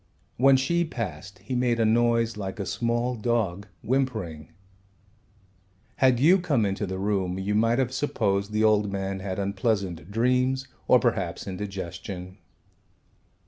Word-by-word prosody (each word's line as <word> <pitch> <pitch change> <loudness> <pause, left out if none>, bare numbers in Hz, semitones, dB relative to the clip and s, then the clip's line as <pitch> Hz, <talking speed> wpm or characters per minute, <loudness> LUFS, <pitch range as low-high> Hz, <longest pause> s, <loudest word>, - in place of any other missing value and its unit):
When 135 +2 +6
she 170 +7 +1
passed 100 - -6
he 130 - -4
made 125 -1 +1
a 115 - +3
noise 115 0 +2
like 95 -1 -5
a 100 - -2
small 120 +3 -1
dog 110 -4 -1 0.2
whimpering. 110 - -2 1.5
Had 130 -2 +4
you 175 +8 +5
come 145 -11 +1
into 100 +1 -2
the 95 0 -4
room 95 -2 -1
you 95 +2 -2
might 115 +3 +3
have 130 -1 0
supposed 100 -8 0
the 110 +1 +1
old 105 -2 +3
man 95 0 -3
had 95 -1 -4
unpleasant 100 -3 -1
dreams 125 +4 +1 0.2
or - - +7
perhaps - - -1
indigestion. 95 -1 -6
110 Hz, 140 wpm, -26 LUFS, 95-125 Hz, 1.5 s, or